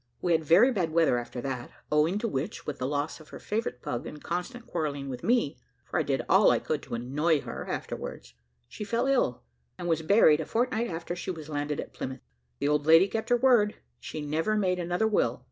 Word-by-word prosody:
We 175 - 0
had 160 -1 +3
very 185 - +6
bad 185 -8 0
weather 160 -6 +3
after 120 +1 -6
that, 130 -2 -4 0.2
owing 155 +5 +3
to 230 - -1
which, 160 0 -4
with 150 - -5
the 130 - -1
loss 145 +3 -2
of 155 - -15
her - - -8
favourite 210 - -3
pug, 120 - -3
and 150 - -8
constant 180 - -4
quarrelling 145 -4 -3
with 130 +2 -6
me 230 - +1 0.3
for - - -1
I - - +3
did - - -1
all - - +6
I - - +4
could - - -2
to - - -5
annoy 145 +6 +1
her - - -7
afterwards 60 0 -5 0.3
she - - -7
fell 235 +4 0
ill, 260 - +1 0.3
and 175 - -5
was 165 -2 +1
buried 160 -3 +5
a 160 - -2
fortnight 235 0 0
after 170 0 -4
she 180 - -6
was 160 -4 -6
landed 145 0 -2
at - - -6
Plymouth. 130 0 -6 0.4
The - - -1
old 150 0 +1
lady 165 +4 +7
kept 220 +4 -3
her 245 - +5
word; 235 -5 +4 0.2
she 155 - -6
never 160 +9 0
made 185 -3 +1
another 175 +5 0
will. 215 - +1
165 Hz, 220 wpm, -28 LUFS, 145-210 Hz, 0.4 s, lady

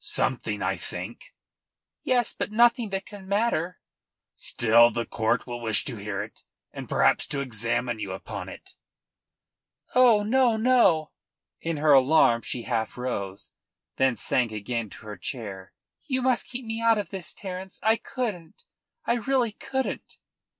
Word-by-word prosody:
"Something, - - -1
I - - 0
think." - - -6 0.7
"Yes; 245 -3 +1
but - - -4
nothing 235 0 +4
that 195 0 -3
can 200 -2 -11
matter." 200 -4 0 0.6
"Still 115 +1 +4
the 115 +1 -3
court 110 0 0
will 120 -1 -6
wish 110 -2 +1
to 125 -5 -4
hear 100 -1 -3
it 110 - -12 0.3
and - - -7
perhaps - - +3
to 145 - -2
examine 115 -2 -1
you 100 -3 -4
upon 95 - -6
it." - - -12 1.2
"Oh 240 -4 +6
no, 240 +1 +3
no!" 220 -10 +4 0.5
In 165 -1 -2
her 150 0 +4
alarm 130 -3 +5
she 120 +1 -4
half 115 -2 -2
rose, 100 -6 -4 0.5
then 130 -2 +3
sank 120 +2 0
again 110 +1 -3
to - - -13
her 105 -1 -7
chair. 100 -7 -6 0.4
"You 260 -3 0
must 255 -2 +1
keep 250 -1 -5
me 225 0 -3
out 230 -1 +4
of 205 - -4
this, 190 -3 -5
Terence. 190 -1 -7
I 220 +1 +4
couldn't 210 -13 -4 0.5
I - - +2
really 245 -1 +1
couldn't." 265 +5 -4
160 Hz, 150 wpm, -26 LUFS, -, 1.2 s, Oh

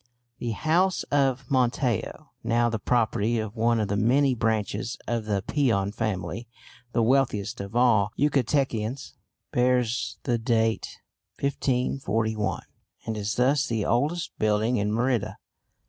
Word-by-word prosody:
The 120 -2 -2
house 175 - +1
of 135 -1 +1
Montejo 125 -3 0
now 120 0 +2
the 115 - -2
property 115 -1 +1
of 110 0 -4
one 115 0 +2
of 105 - 0
the 100 - -1
many 130 +6 +3
branches 110 -1 -1
of 115 -2 -2
the 100 -2 -1
Peon 115 -9 +1
family, 110 +2 -3 0.4
the 115 - +1
wealthiest 120 -6 +1
of 100 +3 -8
all 115 -5 +4
Yucatecans 135 -4 0 0.4
bears 120 -5 +1
the 120 -1 0
date 115 -1 0 0.4
1541, 115 -7 -1 0.4
and 110 - -3
is 105 +1 -2
thus 135 +3 +2
the 110 -3 -1
oldest 150 +8 0
building 110 +3 +2
in 105 0 0
Merida. 120 0 0
115 Hz, 130 wpm, -26 LUFS, 110-130 Hz, 0.4 s, all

